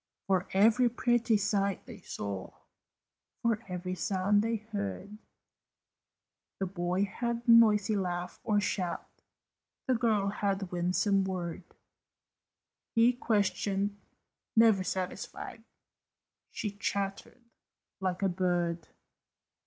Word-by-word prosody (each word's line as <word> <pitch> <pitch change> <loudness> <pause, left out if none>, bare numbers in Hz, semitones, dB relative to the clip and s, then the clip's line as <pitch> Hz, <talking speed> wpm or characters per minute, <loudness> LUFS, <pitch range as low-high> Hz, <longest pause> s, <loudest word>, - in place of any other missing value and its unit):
For 190 -2 +1
every 225 +5 +5
pretty 240 -1 +2
sight 200 -1 0
they - - -10
saw, 100 -2 -6 0.9
For 230 -2 +1
every 180 0 -4
sound 190 +3 +1
they 230 +1 0
heard, 210 - -5 1.4
The 195 - 0
boy 180 +1 -1
had 235 +3 -3
noisy 220 -3 +6
laugh 180 -2 -3
or 210 -2 +2
shout, 185 -3 -2 0.8
The 260 - +2
girl 220 -4 +2
had 200 -2 -2
winsome 185 +3 +2
word 180 -2 -5 1.2
He 230 +2 +5
questioned, 205 -3 0 0.6
never 220 -4 +5
satisfied, 190 +4 -4 0.9
She 210 -4 -4
chattered 200 +3 -3 0.6
like 185 0 -2
a - - +4
bird. 175 -2 0
200 Hz, 100 wpm, -31 LUFS, 185-220 Hz, 1.4 s, noisy